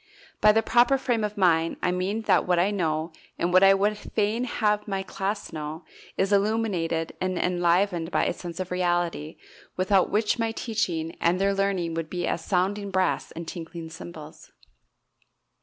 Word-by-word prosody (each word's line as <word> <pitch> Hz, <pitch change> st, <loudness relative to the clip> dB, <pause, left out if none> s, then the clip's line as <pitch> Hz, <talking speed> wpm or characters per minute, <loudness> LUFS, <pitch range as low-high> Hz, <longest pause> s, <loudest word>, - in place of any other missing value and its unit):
By 215 Hz, -, +7 dB
the 225 Hz, +1 st, +2 dB
proper 240 Hz, +5 st, +4 dB
frame 240 Hz, -4 st, 0 dB
of 210 Hz, 0 st, -3 dB
mind 165 Hz, -4 st, +2 dB
I 180 Hz, -, +2 dB
mean 190 Hz, +5 st, -2 dB
that -, -, +3 dB
what 180 Hz, -1 st, +3 dB
I 185 Hz, +4 st, +2 dB
know, 160 Hz, -4 st, -1 dB, 0.3 s
and 175 Hz, +1 st, -1 dB
what 185 Hz, -, +7 dB
I 195 Hz, 0 st, +7 dB
would 205 Hz, +2 st, +1 dB
fain 215 Hz, +3 st, -1 dB
have 210 Hz, -4 st, 0 dB
my 195 Hz, -1 st, -2 dB
class 195 Hz, 0 st, -4 dB
know, 155 Hz, +1 st, -6 dB, 0.3 s
is 195 Hz, +1 st, +1 dB
illuminated 195 Hz, -6 st, 0 dB
and 185 Hz, -1 st, -1 dB
enlivened 175 Hz, 0 st, +1 dB
by -, -, +1 dB
a -, -, 0 dB
sense 175 Hz, 0 st, -8 dB
of 185 Hz, -1 st, -4 dB
reality 175 Hz, -3 st, -1 dB, 0.4 s
without 190 Hz, 0 st, +3 dB
which 215 Hz, +3 st, +1 dB
my 225 Hz, -1 st, 0 dB
teaching 175 Hz, -9 st, -2 dB
and 175 Hz, +2 st, +2 dB
their 200 Hz, +1 st, +2 dB
learning 195 Hz, -4 st, 0 dB
would 165 Hz, -1 st, -3 dB
be 175 Hz, -1 st, -2 dB
as 165 Hz, -, -2 dB
sounding 200 Hz, +3 st, 0 dB
brass 185 Hz, -1 st, 0 dB
and 170 Hz, 0 st, -7 dB
tinkling 165 Hz, -1 st, -7 dB
cymbals. 160 Hz, -2 st, -11 dB
185 Hz, 175 wpm, -26 LUFS, 170-205 Hz, 0.4 s, By